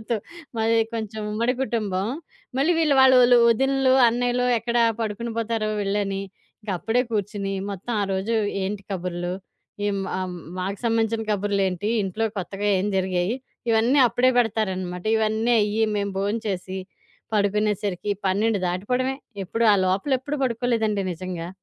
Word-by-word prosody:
అందరితో. 225 +1 -2 0.4
మాది 225 +1 +2 0.2
కొంచెం 220 -1 -4
ఉమ్మడి 235 +4 0
కుటుంబం. 205 -6 -1 0.5
మళ్లీ 310 +6 +3
వీళ్లు, 305 -3 +3
వాళ్లు, 260 -1 +7 0.3
వదినలు, 270 +2 +3
అన్నయ్యలు 245 +1 0
ఎక్కడ 235 +1 -2 0.2
పడుకునిపోతారో 225 0 -2
వెళ్లని, 195 -1 -1 0.4
ఇంక 210 - -5
అప్పుడే 235 +6 +1
కూర్చొని 205 -2 -2 0.2
మొత్తం 200 +5 -5
ఆ - - +1
రోజు 195 +5 -1 0.3
ఏంటి 200 +1 -3
కబుర్లు, 175 -1 -3 0.6
ఈం 200 -1 -1 0.2
ఆహ్, 185 - -1
హ్మ్, 180 - -7 0.2
మాకు 195 +2 -3
సంబంధించిన 225 -1 +1
కబుర్లేంటి, 200 -1 0 0.2
ఇంట్లో 205 +4 -2
కొత్తగా 195 +2 -3
ఏం 190 - -1
జరిగాయి 185 +3 0 0.4
ఇవన్నీ 230 +5 +3
అప్పుడే 245 +2 +2
పెడతారనమాట. 190 -6 -1
ఇవన్నీ 220 +2 +1
అయ్యి 210 +1 +1
మేము 200 -1 -1
బోం 200 +3 0
చేసి 190 -1 -3 0.6
పడుకునేసరికి 205 -1 0 0.2
12 205 +3 +2
దాటిపోవడమే. 250 +9 -1 0.3
ఎప్పుడు 230 +5 -1
ఆ - - +6
లోపలెప్పుడు 265 +9 0
పడుకోలేదండి 230 -4 0
నిజంగా. 175 -1 -5
210 Hz, 130 wpm, -24 LUFS, 195-230 Hz, 0.6 s, వాళ్లు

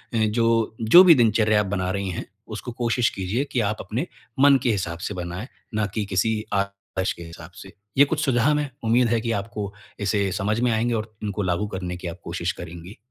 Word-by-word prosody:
जो, 115 0 +2
जो 170 +12 +9
भी 170 -3 +8
दिनचर्या 110 -3 +3
आप - - -2
बना 95 -2 -1
रही 100 -1 -2
हैं, 85 - -4 0.2
उसको 110 +3 -6
कोशिश 120 0 +1
कीजिए 100 +8 -2
कि 125 - 0
आप 105 - -3
अपने - - -3 0.3
मन 140 0 +7
के 120 - +3
हिसाब 85 -4 -2
से 95 - -4
बनाए, 90 +5 -5 0.3
ना 110 -1 +1
कि 105 +1 -3
किसी 110 +3 +1 0.2
आदर्श 100 -1 -2
के 85 - -10
हिसाब 85 +1 -11
से। 95 - -12 0.2
ये 145 - +8
कुछ 155 +2 -1
सुझाव 135 +3 +3
है। 145 -2 -3
उम्मीद 120 +2 +3
है 115 -1 +1
कि 115 0 -2
आपको 105 -1 -6 0.3
इसे 100 -1 0
समझ 105 +5 -1
में 125 -1 +2
आएँगे 115 +2 +1
और 110 0 -3
इनको 105 0 -2
लागू 90 +3 0
करने 90 -2 -5
की 90 - -6
आप 85 +1 -7
कोशिश 85 +1 -2
करेंगी। 85 +4 -9
105 Hz, 210 wpm, -24 LUFS, 95-115 Hz, 0.3 s, जो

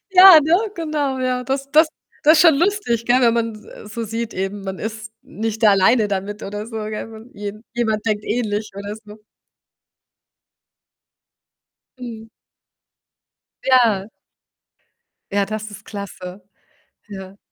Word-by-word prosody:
Ja, 370 -3 +10
ne, 325 +4 +4 0.2
genau, 300 -5 -2
ja. 255 -1 -1
Das 275 +2 -3
Das 310 +2 +5 0.4
Das 310 +2 +7
ist - - +6
schon 325 -4 +7
lustig, 340 - 0
gell? 250 +2 +4
Wenn 235 -1 +4
man 230 -1 -1
s 215 - -14
äh, - - -13
so 230 +1 -5
sieht 225 +1 -4
eben, 195 +2 -3
man 190 -1 -5
ist 220 0 -6
nicht 220 +1 -3
alleine 205 +3 +4
damit, 200 +1 -4
oder 205 +2 -5
so, 225 -1 -8
gell? 215 +1 -5
Man 225 +2 -13
je 205 0 -5 0.2
jemand 220 -3 -1
denkt 210 -1 -1
ähnlich, 215 -2 -2
oder 200 +1 -6
so. 215 -1 -14 2.8
Mhm. 225 -3 -8 1.4
Ja. 230 -7 +3 1.2
Ja, 200 -1 +1
das 215 0 -5
ist 205 - -12
klasse, 195 -2 -8 0.7
ja. 190 -1 -9
220 Hz, 135 wpm, -20 LUFS, 205-250 Hz, 2.8 s, Ja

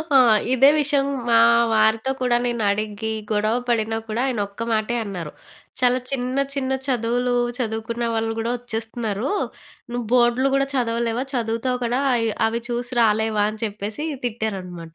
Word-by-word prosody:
ఆ! - - +9 0.4
ఇదే 270 +2 +7
విషయం 280 -1 +1 0.2
మా 230 - +5 0.4
వారితో 220 +4 +3
కూడా 245 -1 +3
నేను 235 -2 -1
అడిగి, 215 +1 -2 0.2
గొడవ 215 +2 +1
పడినా 225 -1 0
కూడా 225 +3 -1
ఆయన 245 -5 -1
ఒక్క 230 +4 -6
మాటే 220 +2 0
అన్నారు, 175 -6 -5 0.5
"చాలా 250 0 +4
చిన్న, 255 0 -2 0.2
చిన్న 265 -1 -2 0.2
చదువులు 245 0 0 0.2
చదువుకున్న 230 0 -3
వాళ్ళు 225 0 0
గూడా 230 +2 -1
ఒచ్చేస్తున్నారు. 225 -1 -3 0.6
నువ్వు 240 -1 -3
బోర్డ్లు 250 +2 +4
గూడా 275 0 +2
చదవలేవా 235 0 0
చదువుతావు 235 +1 -1
కదా! 245 +3 0
ఆహ్, 230 -2 +1 0.2
అవి 230 +1 -2
చూసి 240 +1 -3
రాలేవా" 215 -1 +2
అని 215 +1 -10
చెప్పేసి 210 +5 -5 0.2
తిట్టారనమాట. 185 -8 -4
230 Hz, 145 wpm, -22 LUFS, 220-245 Hz, 0.6 s, ఆ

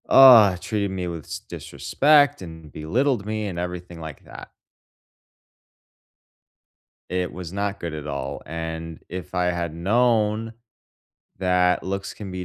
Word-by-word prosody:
Uh, 115 -8 +9
treated 100 0 -2
me 90 -2 -3
with 85 -3 -6
s - - -6
disrespect 145 -2 +2
and 80 -3 -10
belittled 115 - 0
me 110 0 -2
and 90 -3 -5
everything 90 -1 -6
like 80 -3 -9
that. - - -11 2.6
It 90 0 -2
was 90 -2 -7
not 100 +1 -2
good 85 -2 -5
at 75 -1 -6
all, 70 -1 -4
and 80 0 -5
if 90 -1 -7
I 90 0 +1
had 85 -2 -1
known 110 +4 +1 0.9
that 90 -1 +2
looks 100 +1 -4
can 100 -3 -8
be 90 0 -5
90 Hz, 135 wpm, -23 LUFS, 85-105 Hz, 2.6 s, Uh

